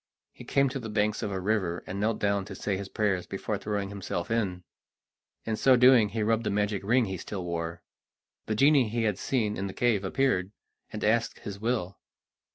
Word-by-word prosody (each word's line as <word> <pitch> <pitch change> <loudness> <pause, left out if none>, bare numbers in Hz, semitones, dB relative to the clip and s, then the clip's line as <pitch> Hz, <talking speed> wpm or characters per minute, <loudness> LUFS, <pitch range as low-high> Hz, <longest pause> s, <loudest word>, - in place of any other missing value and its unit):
He - - -12
came 140 0 +3
to 135 +1 -4
the 115 -3 -6
banks 105 0 0
of - - -2
a 95 - -2
river, 95 -3 -1
and 95 +2 -5
knelt 110 +1 +1
down 100 -1 +1
to - - -8
say 100 - -2
his 95 0 -5
prayers 100 -5 0
before 100 +1 -3
throwing 100 -2 -2
himself 100 -2 -4
in. 95 -6 -1 0.8
In 110 - -1
so 130 +4 +5
doing 125 -3 +6
he 110 +1 -2
rubbed 115 +1 +1
the - - -1
magic 105 0 0
ring 120 +4 +3
he 95 -2 -4
still 95 +1 -6
wore. 85 -1 -4 0.6
The 110 - 0
genie 135 -1 +4
he 115 +1 -1
had 105 -4 0
seen 110 -6 0
in 100 +1 -3
the 95 - -6
cave 115 -5 +1
appeared, 95 -3 0 0.4
and 105 - -5
asked 115 +2 +1
his 100 -1 -7
will. 110 -4 -2
105 Hz, 205 wpm, -28 LUFS, 95-115 Hz, 0.8 s, doing